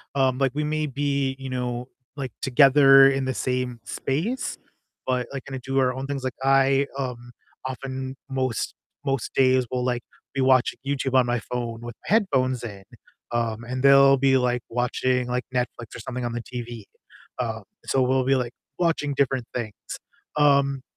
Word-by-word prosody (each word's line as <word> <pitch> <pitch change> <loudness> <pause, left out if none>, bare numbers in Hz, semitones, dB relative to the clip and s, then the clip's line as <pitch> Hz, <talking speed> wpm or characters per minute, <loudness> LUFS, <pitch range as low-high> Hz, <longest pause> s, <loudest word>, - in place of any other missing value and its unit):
um, 130 -1 +2
like, 135 -2 +2
we 150 - 0
may 155 0 -1
be, 140 -1 -1
you 135 -1 -7
know, 125 -1 -3 0.3
like, 135 -4 -5
together 135 0 +7
in 135 -1 -1
the 130 - -1
same 125 -1 -2
space, 185 - -2 0.5
but, 125 -1 0
like, 135 -1 -6
kinda 135 -1 -6
do 135 +1 -3
our 130 -1 +2
own 130 +1 -5
things, 140 -2 -4
like 130 -1 -2
I, 135 0 +4
um, 125 -3 -5 0.3
often 130 0 -5
most 130 -4 -1 0.3
most 135 -4 -1
days 130 -1 +4
will, 125 -1 -1
like, 125 -1 0 0.3
be 135 - -3
watching 130 -1 +3
YouTube 135 -2 -1
on 130 -1 +5
my 120 0 0
phone 115 -1 -5
with 120 0 -7
my - - +1
headphones 130 - +2
in, 100 -4 -7 0.5
um, 115 -1 -1
and 130 +2 -4
they'll 140 0 +7
be, 135 0 +4
like, 125 -1 +1
watching, 125 +1 0
like, 125 0 -1
Netflix 125 -2 -3
or - - -7
something 125 +2 -5
on 120 - -2
the 120 - -3
TV, 120 -2 -7 0.5
um, - - -3 0.2
so 135 - +1
we'll 130 +1 +2
be, 135 +1 +3
like, 125 -2 -2 0.3
watching 165 -4 +1
different 135 -2 +1
things, 110 -4 -4 0.6
um 140 -2 +3
130 Hz, 175 wpm, -25 LUFS, 125-135 Hz, 0.6 s, together